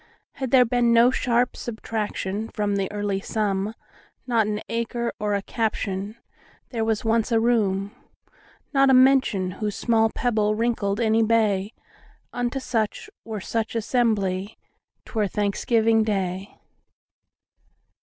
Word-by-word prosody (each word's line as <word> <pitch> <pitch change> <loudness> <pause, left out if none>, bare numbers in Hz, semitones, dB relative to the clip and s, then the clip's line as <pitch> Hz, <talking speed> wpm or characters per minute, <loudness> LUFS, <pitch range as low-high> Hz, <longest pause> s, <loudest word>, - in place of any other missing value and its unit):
Had 265 -2 -5
there 250 0 +6
been 240 0 +2
no 235 +2 +6
sharp 245 -1 +1
subtractionFrom 210 -2 -3
the 195 0 -1
early 205 -1 -2
sum, 205 0 -1 0.5
Not 230 -4 +2
an 210 0 -2
acre 235 +1 -2
or 210 -1 0
a 200 - -2
captionWhere 220 +2 -4
was 220 0 -1
once 225 +1 +1
a 225 - +4
room, 205 -4 +1 0.8
Not 275 -1 +4
a 265 - +6
mention, 255 -8 +4
whose 210 +2 -4
small 225 -2 +2
pebbleWrinkled 215 -2 0
any 225 -1 +3
bay,—Unto 225 +3 -2
such, 245 - -2
were 220 -3 -5
such 225 +4 -3
assembly,'T 210 -4 -2
were 215 -3 +1
Thanksgiving 220 +3 +1
day. 195 -2 -3
220 Hz, 115 wpm, -24 LUFS, 205-235 Hz, 0.8 s, there